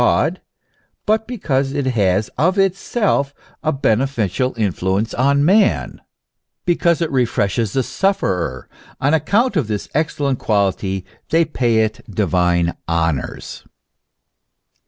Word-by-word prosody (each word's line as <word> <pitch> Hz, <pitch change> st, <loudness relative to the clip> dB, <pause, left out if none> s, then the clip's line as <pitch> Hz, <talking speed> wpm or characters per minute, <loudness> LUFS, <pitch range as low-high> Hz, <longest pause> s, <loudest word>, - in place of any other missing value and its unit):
271 -, -, +2 dB, 0.6 s
but 220 Hz, +1 st, +1 dB
because 140 Hz, -, -1 dB
it 140 Hz, -2 st, -1 dB
has 105 Hz, -5 st, +1 dB
of 185 Hz, +5 st, 0 dB
itself 195 Hz, -, +1 dB, 0.3 s
a 155 Hz, -, +1 dB
beneficial 130 Hz, -, 0 dB
influence 100 Hz, +1 st, -1 dB
on 140 Hz, +3 st, +2 dB
man, 200 Hz, +4 st, +2 dB, 0.6 s
because 170 Hz, -1 st, +2 dB
it 160 Hz, -, -3 dB
refreshes 115 Hz, -4 st, 0 dB
the 135 Hz, -, +1 dB
sufferer; 130 Hz, -, -1 dB, 0.3 s
on 145 Hz, +3 st, +2 dB
account 200 Hz, -, +2 dB
of 150 Hz, -, +1 dB
this 105 Hz, -2 st, -3 dB
excellent 145 Hz, -3 st, 0 dB
quality 95 Hz, -2 st, 0 dB, 0.2 s
they 165 Hz, +1 st, +3 dB
pay 120 Hz, -7 st, +1 dB
it 110 Hz, 0 st, -4 dB
divine 90 Hz, -3 st, +1 dB
honours. 80 Hz, -4 st, -2 dB
130 Hz, 115 wpm, -19 LUFS, 100-160 Hz, 0.6 s, they